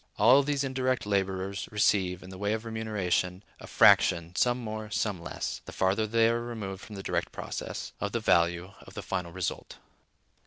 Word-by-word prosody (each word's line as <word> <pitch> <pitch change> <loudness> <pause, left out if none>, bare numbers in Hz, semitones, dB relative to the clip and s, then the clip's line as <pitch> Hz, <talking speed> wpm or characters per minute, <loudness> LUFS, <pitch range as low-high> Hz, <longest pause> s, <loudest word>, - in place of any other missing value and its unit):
All 125 +7 +7
these 140 0 -1
indirect 130 -2 -1
laborers 95 -1 -1
receive, 95 -3 +1
in 95 - -10
the 95 - -9
way 105 +1 0
of 110 +1 -4
remuneration, 105 -4 -1 0.2
a - - -10
fraction, 85 0 +4
some 120 +3 +2
more, 110 -2 -5
some 100 -4 -1
less - - -5
(the - - -8
farther 95 +4 +1
they 115 +1 +3
are 115 +1 +1
removed 105 -5 -6
from 105 - -10
the 95 - -7
direct - - -2
process), - - -5
of 100 +1 -2
the 115 - -1
value 85 -2 +2
of - - -14
the - - -5
final 85 -1 -3
result. 95 0 -4
105 Hz, 185 wpm, -29 LUFS, 95-115 Hz, 0.2 s, All